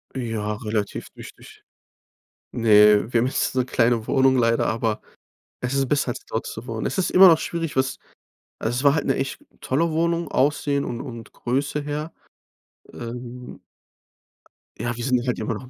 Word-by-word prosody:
Ja, 115 -4 -2
relativ 105 -2 -3
richtig. - - -13 0.9
Ne, 105 0 +5
wir 120 - +3
haben 120 - +1
jetzt 130 - 0
so 130 - +1
'ne 125 - -1
kleine 115 -3 +1
Wohnung 135 -1 +3
leider, 115 -2 +2
aber 110 -1 -1 0.6
es 125 +1 -2
ist 135 -1 +1
besser, 140 -3 +1
als 120 - -5
dort 110 - -3
zu 110 - -7
wohnen. 115 -2 -4
Es - - -2
ist 190 - +1
immer 190 +1 +9
noch 165 -3 +6
schwierig, 165 -3 -4
was 130 0 0 0.6
also 110 +2 -1
es 130 - -2
war 140 0 +5
halt 150 - -1
'ne 135 - +1
echt 135 0 -3 0.2
tolle 165 +6 +1
Wohnung, 170 +1 0
Aussehen 140 0 +1
und 120 - -4
und 115 -4 -9
Größe 140 +4 -2
her. 150 +2 -4 0.8
Ähm 125 +1 -8 1.2
Ja, 120 0 -2
wir 120 - -5
sind 130 0 +2
hier 120 - -6
halt 125 - -1
immer 110 - -2
noch 110 - -8
am 125 - -13
125 Hz, 185 wpm, -23 LUFS, 115-140 Hz, 1.2 s, immer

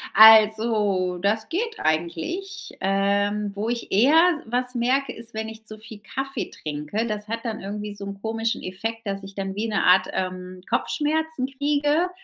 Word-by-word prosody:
Also 215 -4 +6
das 215 +4 0
geht 445 +5 -3
eigentlich. 175 - -2
Ähm, 200 +1 +1
wo 215 +3 -2
ich 240 -1 -4
eher 265 +11 +5 0.2
s 225 - -15
was 250 +1 0
merke 250 +2 0
ist, 230 0 -7
wenn 220 0 -3
ich 220 0 -10
zu 215 0 -7
viel 215 -1 -10
Kaffee 270 +5 -4
trinke. 150 +9 -4
Das 210 -1 -4
hat 230 +2 -4
dann 220 -1 -3
irgendwie 205 +1 -5
so 200 -1 -7
'n 200 0 -7
komischen 225 +1 -2
Effekt, 225 +5 -4
dass 195 0 -3
ich 195 0 -11
dann 195 -1 -3
wie 220 +1 -2
eine 200 - +1
Art, 185 +1 +5
ähm, 185 0 -4
Kopfschmerzen 305 +3 0
kriege, 290 +5 +1
220 Hz, 170 wpm, -24 LUFS, 195-250 Hz, 0.2 s, Also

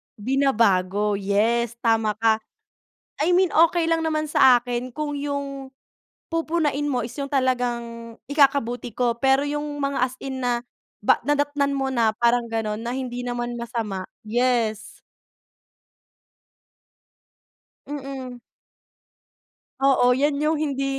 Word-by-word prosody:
binabago 210 -5 +1
yes, 225 +4 +1
tama 225 -2 +2
ka. 220 0 +2 0.8
I 330 +4 +2
mean 370 -1 +3
okey 330 +1 +3
lang 325 0 +1
naman 310 -1 -1
sa 255 -4 +6
akin 245 0 -4
kung 295 -1 -3
yung 280 -2 -4 0.5
pupunahin 315 -3 -1
mo 245 -3 -1
is 240 - -9
yung 280 -1 -5
talagang 240 -3 -1
ikakabuti 270 -5 +2
ko 235 +1 0
pero 270 +3 +2
yung 295 +1 -2 0.2
mga 275 0 -1
as 255 - -12
in 265 -1 -5
na 240 -1 +1 0.4
ba 210 - +3
nadatnan 290 0 +1
mo 270 0 -1
na 230 -3 +3
parang 235 0 +2
gano'n 220 -1 -2
na 235 +1 -4
hindi 250 -1 -4
naman 240 0 -3
masama 230 -5 -4 0.2
yes. 235 -2 0 2.9
Mm. 270 -3 -6 1.4
Oo 270 -2 +4
'yan 285 +1 +1
yung 310 0 +1
hindi 275 -3 -1
255 Hz, 120 wpm, -23 LUFS, 235-285 Hz, 2.9 s, sa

